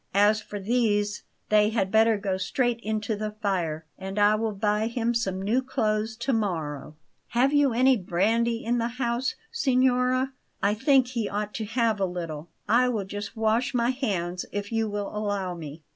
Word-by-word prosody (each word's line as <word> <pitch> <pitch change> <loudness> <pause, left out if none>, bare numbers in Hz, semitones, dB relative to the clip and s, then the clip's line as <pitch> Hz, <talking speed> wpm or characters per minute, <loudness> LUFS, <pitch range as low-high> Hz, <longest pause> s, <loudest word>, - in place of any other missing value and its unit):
"As 210 +2 +4
for 205 -1 -7
these, 205 -1 +1 0.3
they 210 0 +5
had 205 -4 0
better 220 0 +4
go 195 -2 -1
straight 240 +4 0
into 215 -1 -2
the 210 0 -4
fire, 170 -7 -1
and 190 +1 -6
I 205 0 +5
will 220 +1 0
buy 210 +1 0
him 235 0 -1
some 195 -5 -1
new 215 +7 +1
clothes 220 -3 -1
to 235 +3 -1
morrow. 160 - -2 0.3
Have 255 +4 +2
you 290 -2 +4
any 255 +2 +4
brandy 225 +6 0
in 240 +1 +1
the 230 - 0
house, 240 0 -1 0.2
signora? 255 - +2 0.3
I 205 0 +2
think 260 +3 +3
he 235 -5 -2
ought 210 +1 -3
to 220 - -3
have 225 -1 +1
a 195 - +2
little. 170 -3 -5 0.2
I 250 +3 +4
will 215 -5 -1
just 205 +3 -6
wash 225 +4 +1
my 240 +1 +2
hands, 185 -9 -2
if 205 +1 -4
you 225 -1 0
will 205 0 -4
allow 205 -3 -2
me." 155 -2 -9
215 Hz, 180 wpm, -26 LUFS, 200-235 Hz, 0.3 s, they